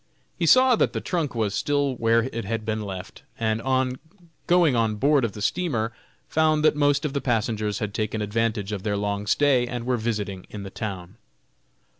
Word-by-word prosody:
He 170 - +1
saw 255 +5 +6
that - - +1
the - - -1
trunk 165 -8 -2
was 110 -4 0
still 145 +1 0
where 115 -1 +2
it 115 -2 -4
had 110 +2 -3
been 110 -1 -2
left, 95 -2 -7 0.2
and 110 -1 0
on 130 0 0 0.5
going 170 -6 +4
on 110 -2 +1
board 140 +4 +3
of 115 -4 -1
the 105 - -6
steamer, 120 -11 -1 0.3
found 155 -1 +2
that 155 - +4
most 145 0 +2
of 145 - -2
the 140 - -1
passengers 110 -3 -1
had 105 -2 -3
taken 110 +1 -2
advantage 105 -1 -1
of 100 -3 -3
their 100 0 -1
long 100 0 -2
stay, 130 0 +3
and 120 -1 -5
were 125 0 +1
visiting 105 -5 -3
in 105 -1 -7
the 95 - -8
town. 95 -1 -6
115 Hz, 195 wpm, -25 LUFS, 105-140 Hz, 0.5 s, saw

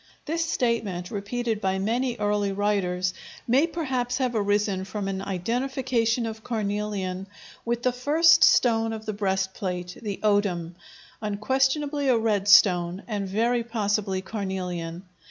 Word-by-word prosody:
This 330 +2 -1
statement, 230 - -1
repeated 220 +2 -2
by 190 -1 0
many 235 +5 0
early 205 -2 0
writers, 190 -3 0 0.3
may 265 +7 +4
perhaps 260 -7 -2
have 255 -2 0
arisen 205 -2 +1
from 195 +1 -4
an 195 -1 -3
identification 230 +4 -1
of 220 -1 -6
carnelian 205 -4 -3 0.4
with 235 +1 -1
the 255 - +3
first 310 +6 +4
stone 225 -2 +4
of 220 0 -7
the 215 - -3
breastplate, 190 -2 -2
the 205 -3 -4
odem, 200 -5 +1 0.5
unquestionably 270 +7 0
a 250 -3 +4
red 210 -3 0
stone, 180 -2 +5
and 205 -4 -3
very 235 +4 +1
possibly 205 -4 -1
carnelian. 185 -4 -4
210 Hz, 130 wpm, -25 LUFS, 190-240 Hz, 0.5 s, stone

